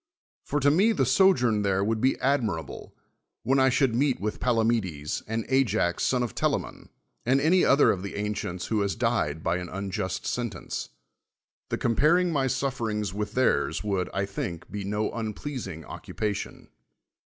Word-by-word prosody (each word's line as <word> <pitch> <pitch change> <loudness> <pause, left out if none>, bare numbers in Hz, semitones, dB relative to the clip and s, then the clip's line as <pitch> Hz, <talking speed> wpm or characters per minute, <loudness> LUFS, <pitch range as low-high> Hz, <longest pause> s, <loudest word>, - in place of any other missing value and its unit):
For 145 - -1
to 145 +1 +5
me 200 +9 +4
the 135 - +1
so 190 +10 +5
journ 120 - +1
there 100 -1 +1
A\ou!d 110 +1 0
be 130 - +2
admirable, 115 - -2 0.5
when 135 +1 +2
I 130 0 +5
should 130 0 +2
1! 120 - +1
eet 140 -3 +1
v. 105 - -2
ith - - -10
l^alamedcs, 110 -11 0
and 110 0 -2
Ajax 110 -10 +1
son 125 -1 +2
of 120 - -4
Tela - - +1
rnon. - - -10 0.4
ai:d 135 +2 +4
any 170 +6 +4
other 140 +1 +5
of 90 - -2
the 100 - -6
ancients 100 -3 -3
who 110 -2 0
has 100 -1 0
dic 115 - 0
d - - -12
by - - +1
an 90 -1 -6
unjust 95 -1 -3
sentence. 120 -4 -4 0.8
The - - -1
compai'ing 165 +9 +3
my 140 -4 +1
suf 135 0 -1
I'ci'ings 105 -4 -2
with 105 +1 -4
theirs 130 -3 +1
would, 95 -3 -1
I 100 +1 -1
think, 90 -4 -5
be 105 -1 -4
no 105 +2 -1
unpleas 115 +3 -4
ing 80 -4 -8
oc< - - -10
upation. 105 -2 -4
110 Hz, 185 wpm, -27 LUFS, 100-135 Hz, 0.8 s, to